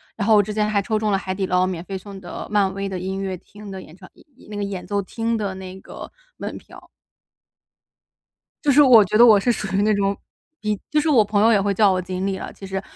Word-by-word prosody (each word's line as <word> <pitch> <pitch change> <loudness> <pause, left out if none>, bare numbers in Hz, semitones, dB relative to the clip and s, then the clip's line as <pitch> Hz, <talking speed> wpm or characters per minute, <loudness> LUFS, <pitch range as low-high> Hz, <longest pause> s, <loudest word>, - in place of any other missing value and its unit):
然 205 -2 -3
后 220 - +6
我 205 - +5
之 210 +2 -5
前 210 0 0
还 205 -1 +1
抽 215 +2 -1
中 215 -1 0
了 195 - +2
海 190 -1 -4
底 190 0 -2
捞 180 0 +2
免 185 -3 -4
费 195 0 -5
送 195 +1 -10
的 175 -2 -8
漫 200 -2 +2
威 195 0 -4
的 190 -1 -4
音 190 +2 -4
乐 190 -1 -3
厅 205 +3 -13
的 190 -1 -7
演 155 - -14
唱 185 0 -15
演 - - -21
演 250 - -19
那 210 - -6
个 205 - -2
演 200 -2 -5
奏 205 -1 -1
厅 230 +4 -2
的 200 -3 -3
那 190 0 -9
个 - - -10 0.3
门 - - -6
票。 - - -15 1.8
就 295 - +3
是 285 +2 +6
我 250 -6 +8
觉 210 - 0
得 235 - +8
我 215 -4 +7
是 240 +5 +1
属 215 - -3
于 200 - +2
那 215 +1 +3
种 200 0 0 0.4
比 210 -1 -2
就 305 - +3
是 300 - -1
我 250 -8 +5
朋 205 0 0
友 225 +2 +5
也 200 - +3
会 200 0 0
叫 200 0 +4
我 185 0 0
锦 185 +1 -4
鲤 195 -1 -2
了 - - -7
其 195 - -11
实。 190 0 -3
200 Hz, 290 characters per minute, -22 LUFS, 190-215 Hz, 1.8 s, 我